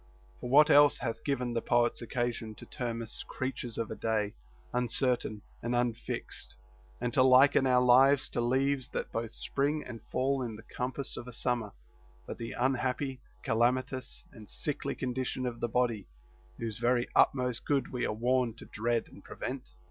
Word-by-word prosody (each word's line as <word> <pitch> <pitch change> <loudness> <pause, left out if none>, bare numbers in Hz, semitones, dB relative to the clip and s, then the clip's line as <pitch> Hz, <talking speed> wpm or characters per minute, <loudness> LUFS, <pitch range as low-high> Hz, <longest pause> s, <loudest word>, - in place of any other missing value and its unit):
For 125 - -5
what 150 +4 +7
else 145 0 +7
hath 115 -2 -4
given 125 -4 -1
the 115 - 0
poets 120 +1 +2
occasion 120 -2 -3
to - - -11
term 115 -2 -4
us 115 - -5
creatures 130 -3 -4
of 115 - -2
a - - -3
day, 110 -2 -1 0.4
uncertain 125 -3 0 0.2
and 120 +1 -1
unfixed, 120 -1 -3 0.4
and 120 -1 -2
to 130 - +4
liken 130 +1 +6
our 125 -1 +4
lives 130 +2 +6
to - - -1
leaves 130 +2 +1
that - - -4
both 115 0 -2
spring 145 +6 -1
and 120 -3 -8
fall 135 +1 +1
in 115 -3 -4
the 110 - -11
compass 130 +3 -4
of 120 - -7
a - - -7
summer, 120 -3 -1 0.5
but - - -7
the 115 - -5
unhappy, 130 +1 0 0.2
calamitous, 130 +2 0
and 105 -2 -13
sickly 150 - -3
condition 130 0 -2
of 120 -2 -3
the 120 - -1
body, 115 -4 0 0.5
whose 115 -2 -4
very 120 0 +2
utmost 125 -3 +3
good 140 -2 +1
we 125 - -2
are - - +1
warned 120 +1 +1
to - - -11
dread 115 +2 -1
and - - -15
prevent? - - -6
125 Hz, 170 wpm, -31 LUFS, 115-130 Hz, 0.5 s, what